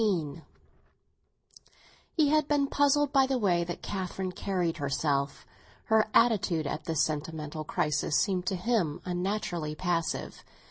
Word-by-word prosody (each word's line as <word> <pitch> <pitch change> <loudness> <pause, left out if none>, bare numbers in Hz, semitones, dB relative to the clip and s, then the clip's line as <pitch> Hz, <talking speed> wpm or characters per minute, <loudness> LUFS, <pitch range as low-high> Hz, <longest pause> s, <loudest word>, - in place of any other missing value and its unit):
XV 165 -8 0 1.8
HE 305 -3 +4
had 305 -1 +3
been 290 -2 +2
puzzled 285 0 +2
by 270 -1 +5
the 265 -1 +1
way 180 -7 +2
that 175 0 -6
Catherine 190 -1 -3
carried 180 -3 -1
herself; 140 0 -1 0.4
her 220 -1 +4
attitude 195 -9 +3
at 155 - -4
this 160 -2 +1
sentimental 155 0 -3
crisis 150 0 0
seemed 185 -3 0
to 195 - +1
him 180 -5 0
unnaturally 175 -4 -2
passive. 165 -2 -2
180 Hz, 130 wpm, -29 LUFS, 155-220 Hz, 1.8 s, by